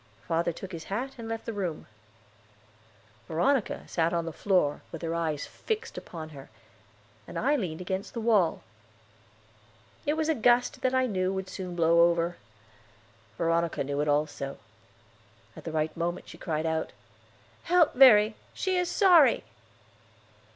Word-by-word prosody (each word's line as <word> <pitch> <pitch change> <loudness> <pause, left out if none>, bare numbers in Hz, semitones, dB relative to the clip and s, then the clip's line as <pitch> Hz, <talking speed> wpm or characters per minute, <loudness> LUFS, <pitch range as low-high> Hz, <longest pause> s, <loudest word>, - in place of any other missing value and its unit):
Father 170 0 +1
took 185 +3 -9
his 165 -2 -7
hat 250 +7 -3
and 230 - -6
left 225 0 -5
the 230 - -4
room. 180 -6 -4 1.4
Veronica 240 - 0
sat 165 -1 +1
down 170 - -1
on 170 - -2
the 165 - -5
floor, 180 -7 +1
with 165 0 -8
her 165 0 -2
eyes 160 -3 -2
fixed 440 -1 -4
upon 160 -2 -8
her, 140 -2 -12 0.8
and - - -7
I 290 - +2
leaned 180 - -3
against 190 +4 -4
the - - -2
wall. 215 -7 +2 1.4
It 295 - +2
was 315 -1 0
a 320 - +3
gust 245 -1 +2
that 255 0 +1
I 260 0 +3
knew 185 -5 0
would 190 -1 -4
soon 185 -2 -6
blow 170 0 +5
over. 170 0 -1 1.0
Veronica 165 -2 0
knew 140 +1 -2
it 150 - -1
also. 145 -2 -1 1.0
At - - -12
the 165 - -4
right 155 0 -1
moment 170 +1 -3
she - - -11
cried 160 -2 -2
out: 160 0 -1 0.7
"Help 350 -3 +4
Verry, 220 -5 +7 0.2
she 375 -1 0
is 360 -1 0
sorry." 355 -8 +5
180 Hz, 155 wpm, -28 LUFS, 165-235 Hz, 1.4 s, Verry